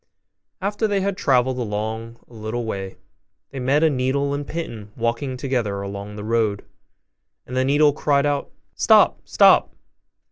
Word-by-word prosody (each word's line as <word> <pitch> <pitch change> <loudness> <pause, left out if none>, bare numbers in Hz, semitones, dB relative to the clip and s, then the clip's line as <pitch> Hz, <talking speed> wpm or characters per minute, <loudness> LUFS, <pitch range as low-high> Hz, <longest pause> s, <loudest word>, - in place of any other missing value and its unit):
After 205 +3 0
they 200 -2 0
had 200 0 -1
travelled 130 -7 +1
along 110 +1 -4
a - - -19
little 110 +2 -4
way, 95 -3 -5 0.5
they 135 - -6
met 135 +5 +2
a 160 - +5
needle 140 +2 0
and 145 0 -4
a - - -6
pin 115 -11 -6
walking 120 +3 -2
together 120 -7 -2
along 100 +1 -7
the 105 - -7
road: 110 -2 0 0.8
and 125 - -7
the 130 - +2
needle 145 +2 +4
cried 145 -1 +1
out, 145 -1 -1 0.2
'Stop, - - +4
stop! - - +4
125 Hz, 155 wpm, -22 LUFS, 110-145 Hz, 0.8 s, a